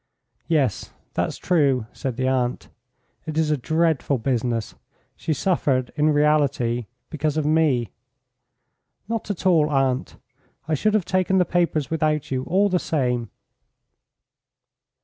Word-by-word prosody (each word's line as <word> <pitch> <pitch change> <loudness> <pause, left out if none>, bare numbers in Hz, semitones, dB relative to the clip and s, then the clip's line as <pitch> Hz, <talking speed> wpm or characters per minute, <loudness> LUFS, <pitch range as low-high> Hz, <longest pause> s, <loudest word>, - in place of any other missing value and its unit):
"Yes, 140 -10 0 0.2
that's - - -1
true," 140 -9 +2
said 130 -4 -4
the 130 -1 0
aunt. 125 -2 -1 0.6
"It 155 -1 -4
is 160 -1 +2
a - - +3
dreadful 160 0 +1
business. 120 -2 -1 0.4
She - - -4
suffered, 140 -6 0
in 150 0 +3
reality, 145 -6 +2 0.2
because 155 0 -1
of 155 - 0
me." 150 -8 +2 1.2
"Not 225 -1 -3
at 200 -3 -4
all, 160 -5 +4
aunt. 135 -2 0 0.5
I 160 - 0
should 210 +8 +1
have 205 -5 +1
taken 185 0 +1
the 180 - +4
papers 170 -5 0
without 155 -3 0
you 130 -1 0
all 195 +4 +3
the 185 -2 +1
same." 125 -8 -1
150 Hz, 130 wpm, -23 LUFS, 130-165 Hz, 1.2 s, all